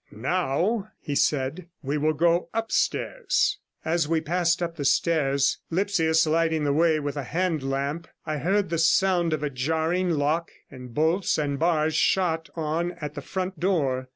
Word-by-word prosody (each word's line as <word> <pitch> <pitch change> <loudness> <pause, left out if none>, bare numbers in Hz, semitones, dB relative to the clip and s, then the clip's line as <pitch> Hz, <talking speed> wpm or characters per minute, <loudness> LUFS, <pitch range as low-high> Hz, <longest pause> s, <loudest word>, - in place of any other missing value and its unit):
'Now,' 180 - -1
he 145 - -5
said, 145 +5 0 0.2
'we 140 +2 -1
will 155 +1 +2
go 170 +3 +2
upstairs.' 375 - 0 0.3
As 165 -1 +1
we 165 0 +1
passed 170 +2 0
up 170 -1 -3
the 150 - -4
stairs, 140 -2 +2
Lipsius 165 -3 +2
lighting 160 0 +1
the 145 -1 +1
way 160 0 +3
with 145 -1 -4
a 145 - -2
hand 165 +2 -1
lamp, 140 +4 -3 0.2
I 155 -1 -2
heard 190 +4 0
the 165 - 0
sound 175 +1 +3
of 155 -1 -1
a 150 - -1
jarring 160 +7 0
lock 155 +1 0 0.2
and 125 -2 -10
bolts 160 +8 +1
and 140 -2 -1
bars 160 -1 +2
shot 165 -3 +1
on 165 +2 -1
at 150 -4 -7
the - - -6
front 185 -2 -4
door. 140 -9 0
160 Hz, 165 wpm, -25 LUFS, 145-175 Hz, 0.3 s, way